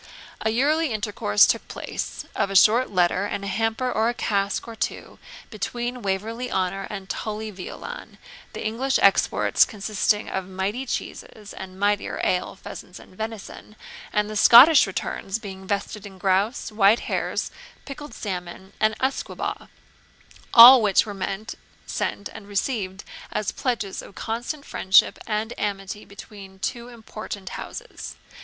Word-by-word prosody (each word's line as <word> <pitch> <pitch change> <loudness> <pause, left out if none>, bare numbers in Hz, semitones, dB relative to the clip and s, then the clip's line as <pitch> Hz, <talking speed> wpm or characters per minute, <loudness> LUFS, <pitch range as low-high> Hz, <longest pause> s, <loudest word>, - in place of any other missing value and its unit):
A 220 - +1
yearly 290 +6 +2
intercourse 205 - +3
took - - 0
place, - - -5
of - - 0
a 195 - -5
short 225 +7 +5
letter 180 +1 +2
and 200 - -4
a - - -4
hamper 225 +4 -1
or 220 0 +1
a 240 - -3
cask 200 -2 -1
or 230 - -8
two, - - -4 0.3
between 240 +3 -4
Waverley 225 +5 -3
Honour 190 +1 -1
and 195 -3 -7
Tully 215 +1 -4
Veolan, 210 - -8 0.4
the - - -6
English 255 +5 0
exports 195 - +4
consisting 210 0 0
of 190 -1 -4
mighty 195 +7 -3
cheeses 210 -3 -6
and 190 0 -9
mightier 205 0 0
ale, 180 - 0
pheasants, 180 - -10
and - - -15
venison, 220 0 -7 0.4
and 210 -1 +1
the 215 - -6
Scottish 250 +6 +8
returns 195 +1 -3
being 190 -4 -9
vested 200 +1 -3
in 195 -1 -13
grouse, 195 +7 0
white 210 +1 +4
hares, - - -2 0.3
pickled 290 +1 -8
salmon, 185 -1 -6
and 215 0 +2
usquebaugh; 265 +1 -3 0.8
all 245 +2 +11
which 205 -1 +3
were 210 - -6
meant, 195 +2 -4 0.3
sent, 200 - -3
and 215 -2 -11
received 200 -2 -2 0.3
as 210 - -1
pledges 230 -7 -2
of 195 - -14
constant 240 +6 -4
friendship 190 +1 +3
and 220 +1 -2
amity 200 0 -4
between 200 -1 -12
two 235 +5 -4
important 215 -4 -8
houses. - - -8
210 Hz, 145 wpm, -24 LUFS, 195-230 Hz, 0.8 s, all